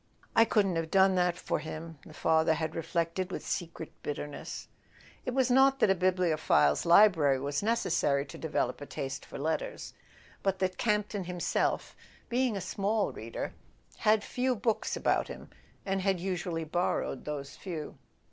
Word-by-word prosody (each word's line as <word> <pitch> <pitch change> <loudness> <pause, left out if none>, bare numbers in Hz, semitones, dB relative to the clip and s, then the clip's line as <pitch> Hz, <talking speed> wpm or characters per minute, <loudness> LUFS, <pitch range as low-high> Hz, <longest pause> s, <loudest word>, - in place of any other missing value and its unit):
"I 225 - +7
couldn't 195 -6 +2
have 165 -1 -2
done 190 +1 +5
that 180 -1 +2
for - - -2
him," 160 0 -7
the 155 - -13
father 160 0 +3
had 160 0 -2
reflected 170 +3 -2
with - - -5
secret 165 -2 -4
bitterness. 145 0 -5 0.6
It 250 - -1
was 260 -2 +3
not 270 +1 +5
that 200 - +4
a - - +6
bibliophile's 170 - +2
library 170 -7 +6
was 140 +1 -2
necessary 165 -10 +1
to - - -10
develop 145 -5 -1
a 145 - -7
taste 135 -1 -5
for - - -9
letters; 160 - -3 0.5
but 195 -1 0
that 185 -1 -1
Camp 210 -2 +1
ton 200 -3 -4
himself, 180 -1 -1 0.3
being 245 -3 +1
a - - -3
small 200 +3 0
reader, 115 +1 -5 0.4
had 215 0 +3
few 255 0 0
books 225 0 0
about - - +1
him, - - -10 0.3
and 195 -1 0 0.2
usually 175 -2 -2
borrowed 160 -4 -1
those 140 -2 -5
few. 165 -6 -6
180 Hz, 155 wpm, -30 LUFS, 155-200 Hz, 0.6 s, I